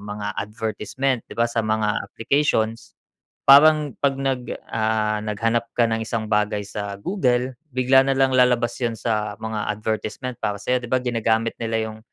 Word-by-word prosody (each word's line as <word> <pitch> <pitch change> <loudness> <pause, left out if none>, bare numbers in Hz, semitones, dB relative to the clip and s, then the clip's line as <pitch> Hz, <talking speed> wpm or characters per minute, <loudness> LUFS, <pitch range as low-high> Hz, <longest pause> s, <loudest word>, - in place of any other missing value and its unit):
mga 105 0 -5
advertisement, 110 +5 -2
'di - - -9
ba, 115 - +3
sa 115 -1 0
mga 110 0 +1
applications. 115 -3 0 0.5
Parang 150 +1 +7
'pag 140 -1 +2
nag, 135 -2 -1 0.3
ah, 110 -1 0
naghanap 115 +2 0
ka 120 - +4
ng 110 0 0
isang 110 -1 -2
bagay 105 -1 +1
sa 100 0 -5
Google, 130 - 0 0.2
bigla 130 +1 +4
na 135 - +2
lang 135 0 +3
lalabas 120 -2 +3
'yun 120 -2 0
sa 105 -2 -1
mga 110 -1 -4
advertisement 110 +3 -4
para 105 -1 -1
sa'yo 125 - +1
'di 120 - -6
ba, 130 - +2
ginagamit 115 -2 0
nila 110 -1 -1
'yung 110 - -11
115 Hz, 165 wpm, -22 LUFS, 110-125 Hz, 0.5 s, Parang